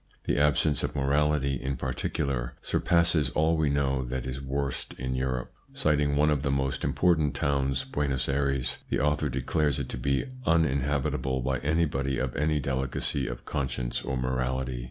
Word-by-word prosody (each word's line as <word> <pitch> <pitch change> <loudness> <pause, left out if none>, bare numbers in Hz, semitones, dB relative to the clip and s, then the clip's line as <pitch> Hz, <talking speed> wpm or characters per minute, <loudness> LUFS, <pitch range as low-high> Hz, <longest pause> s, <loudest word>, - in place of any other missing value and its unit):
The - - 0
absence 75 +1 +3
of - - -3
morality, 70 -1 +1
in 65 +1 -2
particular, 65 -1 -2
surpasses 85 -5 +2
all 80 +2 +3
we 80 -2 +2
know 70 -2 +1
that 65 +1 -3
is 65 +1 -4
worst 70 0 -3
in 65 +1 -3
Europe. 65 -1 -2 0.2
Citing 75 -1 +2
one 75 +1 +4
of 75 -3 +1
the 70 - -1
most 70 -1 0
important 80 -5 +2
towns, 70 -1 +1
Buenos 70 -3 -1
Ayres, 70 -2 0
the - - +1
author 75 +1 +1
declares 65 +3 0
it 70 -3 -4
to 60 - -4
be 70 +2 +1 0.2
uninhabitable 70 -4 +1
by 65 0 0
anybody 70 -2 0
of 65 -1 -2
any 75 +1 +1
delicacy 65 0 -1
of - - -6
conscience 65 -4 -2
or 65 - -3
morality. 65 0 -1
70 Hz, 160 wpm, -28 LUFS, 65-75 Hz, 0.2 s, one